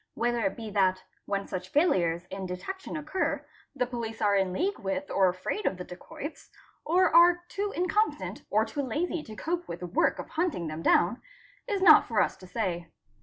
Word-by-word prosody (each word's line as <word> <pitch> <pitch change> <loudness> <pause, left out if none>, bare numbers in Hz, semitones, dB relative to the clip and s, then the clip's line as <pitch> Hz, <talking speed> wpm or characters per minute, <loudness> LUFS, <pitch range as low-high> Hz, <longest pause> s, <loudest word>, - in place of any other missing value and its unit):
Whether 240 0 0
it 195 - -4
be 225 -2 -6
that, 190 -2 +2 0.2
when 200 0 -1
such 185 0 -5
failures 175 - +2
in 190 0 -4
detection 320 - -5
occur, 310 +5 -2 0.3
the 250 - +1
police 235 -2 -5
are 205 -1 +3
in 190 -2 +2
league 370 - -1
with 240 +10 -3
or 190 -1 +4
afraid 185 - -3
of 190 - -1
the 180 - -5
dacoits, 230 - -9 0.3
or 355 +1 +3
are 350 +1 +7
too 405 +1 -2
incompetent 390 +5 0
or - - +3
too 290 - -3
lazy 310 +6 -2
to 220 -6 -10
cope 345 +7 -3
with 170 - -6
the - - -3
work 175 - +1
of - - -7
hunting 320 - -1
them 155 +1 -5
down, 185 +7 +3 0.5
is 400 -5 0
not 320 -5 +8
for 225 -3 +1
us - - +2
to 185 - -13
say. 180 -4 -2
230 Hz, 195 wpm, -28 LUFS, -, 0.5 s, not